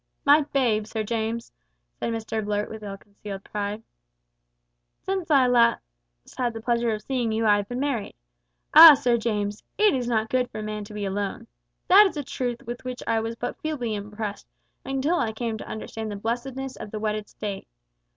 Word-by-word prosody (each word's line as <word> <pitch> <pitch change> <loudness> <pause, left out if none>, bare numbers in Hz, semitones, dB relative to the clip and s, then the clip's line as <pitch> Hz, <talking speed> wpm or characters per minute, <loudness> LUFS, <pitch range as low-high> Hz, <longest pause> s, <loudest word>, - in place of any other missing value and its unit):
"My 290 +2 +7
babe, 225 -6 +1
Sir 220 0 -3
James," 230 +1 -3 0.4
said 230 - -3
Mr 220 -1 -3
Blurt, 205 0 -2
with 220 0 -8
ill 200 -1 -6
concealed 200 -1 -9
pride; 210 +1 -4 1.2
"since 380 -3 -2
last 245 -5 +5 0.6
I - - 0
had 240 -1 0
the - - -4
pleasure 235 0 0
of 215 -1 -4
seeing 245 -3 -1
you 220 +1 0
I 205 -1 +5
have 205 -1 -4
been 245 +1 -3
married. 270 -7 -2 0.6
Ah! 315 -1 +12
Sir 250 -3 +2
James, 210 -2 -2 0.2
`it 420 -7 +4
is 250 -2 -2
not 220 -2 0
good 250 -1 +1
for 215 - -6
man 215 0 -4
to 210 - -11
be 205 -1 -3
alone.' 200 +3 -3 0.4
That 400 +3 +8
is 365 - -6
a 290 - -2
truth 245 -2 -4
with 240 +1 -7
which 255 -1 -6
I 225 -1 +1
was 225 +1 -3
but 245 +1 -5
feebly 270 -8 -2
impressed 210 0 -5 0.4
until 270 +6 0
I 220 - -1
came 225 -1 -3
to - - -8
understand 220 0 -5
the 205 - -4
blessedness 250 +5 -4
of - - -7
the 215 - -5
wedded 215 -1 -2
state. 200 -2 -6
225 Hz, 190 wpm, -25 LUFS, 210-250 Hz, 1.2 s, Ah